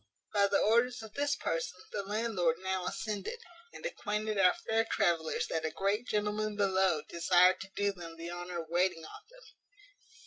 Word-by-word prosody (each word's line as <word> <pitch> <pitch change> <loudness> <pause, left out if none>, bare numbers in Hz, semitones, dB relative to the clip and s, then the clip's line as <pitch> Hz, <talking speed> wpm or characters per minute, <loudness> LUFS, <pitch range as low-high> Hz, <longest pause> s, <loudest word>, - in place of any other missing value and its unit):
By 200 -1 +4
the 200 - +2
orders 235 +2 +2
of 220 -1 -10
this 285 0 0
person, 165 +2 -3
the 205 - -2
landlord 200 -5 0
now 190 -1 -2
ascended, 215 - -3 0.3
and - - -10
acquainted 215 - -2
our 180 -2 +5
fair 225 0 0
travellers 170 -8 +1
that 160 -1 -1
a 160 - 0
great 200 +7 -1
gentleman 210 0 -1
below 190 -5 +2
desired 180 +2 +4
to 190 - -8
do 205 0 +1
them 170 -3 -9
the 170 +1 -6
honour 175 -1 -5
of 160 - -19
waiting 175 -1 +1
on 420 - -11
them. - - -17
195 Hz, 175 wpm, -32 LUFS, 175-215 Hz, 0.3 s, our